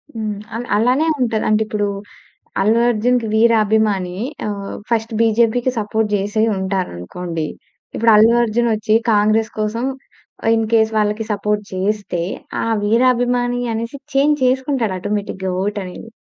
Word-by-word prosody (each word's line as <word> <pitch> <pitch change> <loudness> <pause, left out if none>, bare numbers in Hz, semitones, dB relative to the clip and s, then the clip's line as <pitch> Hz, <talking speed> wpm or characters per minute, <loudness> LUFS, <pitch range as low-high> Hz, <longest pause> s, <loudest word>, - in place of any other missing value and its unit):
హ్మ్. 215 -2 -3 0.2
అల్ 235 +1 -4
అలానే 250 +8 +2 0.2
ఉంటది. 225 -3 0
అం‌టె 215 0 +3
ఇప్పుడు 210 -1 -1 0.7
'అల్లు 215 +4 +3
అర్జున్‌కి' 240 0 +1
వీరాభిమాని 215 -4 +2 0.3
ఆహ్, 200 -1 -4 0.2
ఫస్ట్ 225 0 0
'బీజేపీ‌కి' 230 +2 +2
సపోర్ట్ 220 +1 -1
చేసే 205 +2 -1
ఉంటార 190 -1 -1
అనుకోండి. 165 - -5 0.5
ఇప్పుడు 230 0 +3
'అల్లు 220 +2 +6
అర్జున్' 235 +1 +1
వచ్చి 215 0 +1
'కాంగ్రెస్' 215 +1 +2
కోసం 225 +4 -1 0.6
ఆ - - +3
ఇన్ 225 -1 0
కేస్ 220 -1 +4
వాళ్ళకి 210 +1 0
సపోర్ట్ 210 +1 -1
చేస్తే 195 -2 -1 0.4
ఆ - - -2 0.2
వీరాభిమాని 245 +2 +2
అనేసి 230 +4 -4 0.2
చేంజ్ 290 +2 +3
చేసుకుంటాడు 260 -4 0
ఆటోమేటిక్‌గా 200 -1 -3
వోట్ 205 +2 -2
అనేది. 185 +5 -9
220 Hz, 135 wpm, -19 LUFS, 205-235 Hz, 0.7 s, అల్లు